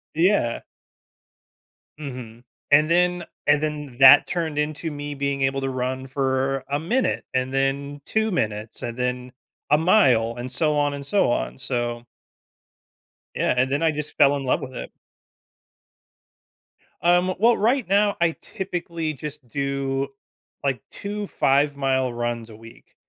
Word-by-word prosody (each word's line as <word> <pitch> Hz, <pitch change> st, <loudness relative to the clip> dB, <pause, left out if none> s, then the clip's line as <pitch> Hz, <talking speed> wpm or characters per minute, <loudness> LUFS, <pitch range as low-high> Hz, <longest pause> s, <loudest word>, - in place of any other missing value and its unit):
Yeah. 165 Hz, -, +2 dB, 1.4 s
Mhm. 125 Hz, -5 st, -8 dB, 0.3 s
And 150 Hz, +2 st, +5 dB
then 180 Hz, 0 st, +2 dB, 0.2 s
and 145 Hz, 0 st, +4 dB
then 150 Hz, -5 st, -4 dB
that 135 Hz, +2 st, +9 dB
turned 160 Hz, -4 st, -2 dB
into 155 Hz, +2 st, -2 dB
me 145 Hz, 0 st, -5 dB
being 140 Hz, -1 st, -2 dB
able 135 Hz, 0 st, +1 dB
to 135 Hz, -, -1 dB
run 130 Hz, +1 st, -3 dB
for 135 Hz, 0 st, -1 dB
a 145 Hz, +1 st, -1 dB
minute 240 Hz, +11 st, 0 dB
and 130 Hz, +1 st, -1 dB
then 140 Hz, +1 st, -1 dB
2 220 Hz, -1 st, 0 dB
minutes 110 Hz, -, -2 dB
and 120 Hz, +1 st, -5 dB
then 125 Hz, 0 st, -2 dB, 0.4 s
a 150 Hz, -, +5 dB
mile 130 Hz, -, +3 dB
and 125 Hz, +1 st, -6 dB
so 150 Hz, +4 st, +1 dB
on 145 Hz, 0 st, +1 dB
and 140 Hz, -1 st, -6 dB
so 195 Hz, -6 st, +2 dB
on. -, -, -2 dB
So 120 Hz, -1 st, -3 dB, 1.3 s
Yeah, -, -, +1 dB
and 130 Hz, +1 st, +2 dB
then 145 Hz, +4 st, 0 dB
I 160 Hz, -, +4 dB
just 150 Hz, 0 st, -6 dB
fell 145 Hz, 0 st, +5 dB
in 135 Hz, -, -5 dB
love 130 Hz, -, +1 dB
with 130 Hz, -1 st, -7 dB
it. -, -, -6 dB, 2.1 s
Um, 175 Hz, +1 st, +3 dB
well, 235 Hz, +3 st, +4 dB
right 240 Hz, +2 st, +1 dB
now, 205 Hz, +1 st, +3 dB
I 170 Hz, -1 st, +4 dB
typically 170 Hz, -4 st, -4 dB
just 150 Hz, -2 st, -8 dB
do, 140 Hz, +1 st, -2 dB, 0.6 s
like, 135 Hz, -2 st, -1 dB
2 205 Hz, 0 st, -5 dB
5 140 Hz, -1 st, +2 dB
mile 130 Hz, -2 st, 0 dB
runs 120 Hz, -1 st, -3 dB
a 110 Hz, -, -11 dB
week. 115 Hz, +1 st, -16 dB
140 Hz, 150 wpm, -23 LUFS, 130-160 Hz, 2.1 s, that